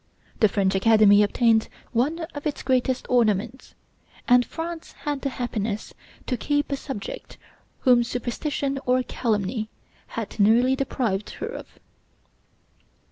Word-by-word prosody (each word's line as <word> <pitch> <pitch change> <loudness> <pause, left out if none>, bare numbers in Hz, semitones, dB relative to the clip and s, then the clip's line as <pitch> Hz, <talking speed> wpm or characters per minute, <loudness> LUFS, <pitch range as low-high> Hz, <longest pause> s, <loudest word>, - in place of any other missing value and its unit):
The 215 - +5
French 195 -1 +1
Academy 210 0 +6
obtained 220 +1 +3 0.2
one 280 +8 0
of 290 +1 -4
its 295 - -4
greatest 260 0 +1
ornaments, 235 0 0 0.5
and 245 0 +6
France 330 +4 -6
had 290 -2 -2
the 275 - -1
happiness 225 -4 -3 0.3
to 250 - -1
keep 290 +4 -1
a - - +1
subject 270 -7 -7 0.4
whom 245 -2 +5
superstition 270 +3 -2
or 255 0 +3
calumny 220 -2 -2 0.4
had 225 -1 -6
nearly 235 +6 +4
deprived 235 -7 -2
her - - -5
of; - - -7
for - - -28
M. - - -27
245 Hz, 135 wpm, -24 LUFS, 215-270 Hz, 0.5 s, Academy